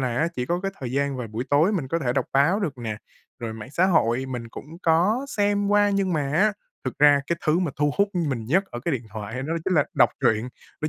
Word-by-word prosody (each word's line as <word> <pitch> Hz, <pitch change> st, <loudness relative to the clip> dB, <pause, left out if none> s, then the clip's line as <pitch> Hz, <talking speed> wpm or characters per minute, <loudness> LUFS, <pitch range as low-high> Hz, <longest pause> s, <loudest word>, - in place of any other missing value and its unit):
là 130 Hz, +6 st, 0 dB
chỉ 125 Hz, 0 st, -3 dB
có 175 Hz, +3 st, -1 dB
cái 195 Hz, +1 st, -3 dB
thời 125 Hz, -1 st, -4 dB
gian 140 Hz, 0 st, 0 dB
vào 125 Hz, -2 st, -4 dB
buổi 110 Hz, +4 st, -4 dB
tối 155 Hz, +8 st, +4 dB
mình 160 Hz, -10 st, -2 dB
có 165 Hz, -, 0 dB
thể 125 Hz, -5 st, -1 dB
đọc 140 Hz, -, 0 dB
báo 145 Hz, +10 st, +3 dB
được 145 Hz, -10 st, -3 dB
nè, 110 Hz, -3 st, -4 dB, 0.4 s
rồi 115 Hz, -2 st, -4 dB
mạng 110 Hz, +4 st, -9 dB
xã 180 Hz, +5 st, +3 dB
hội 130 Hz, -7 st, +2 dB
mình 120 Hz, -3 st, -5 dB
cũng 160 Hz, +8 st, -10 dB
có 185 Hz, +11 st, +2 dB
xem 205 Hz, -2 st, +1 dB
qua. 205 Hz, 0 st, +4 dB
Nhưng 195 Hz, -2 st, 0 dB
mà 155 Hz, -, +1 dB
á, 205 Hz, +7 st, +3 dB, 0.3 s
thực 130 Hz, -, -4 dB
ra 145 Hz, -1 st, +6 dB
cái 170 Hz, -, 0 dB
thứ 155 Hz, +3 st, +3 dB
mà 175 Hz, -5 st, 0 dB
thu 145 Hz, 0 st, +2 dB
hút 200 Hz, 0 st, +4 dB
mình 140 Hz, -10 st, -1 dB
nhất 185 Hz, -, +2 dB
ở 120 Hz, -, -6 dB
cái 170 Hz, -, 0 dB
điện 120 Hz, -, -4 dB
thoại 110 Hz, +4 st, -6 dB
đó 160 Hz, +4 st, -2 dB
chính 185 Hz, -, +1 dB
là 145 Hz, -, +4 dB
đọc -, -, +5 dB
truyện, 120 Hz, -1 st, +2 dB, 0.3 s
đó 155 Hz, -, -1 dB
145 Hz, 260 wpm, -24 LUFS, 125-180 Hz, 0.4 s, ra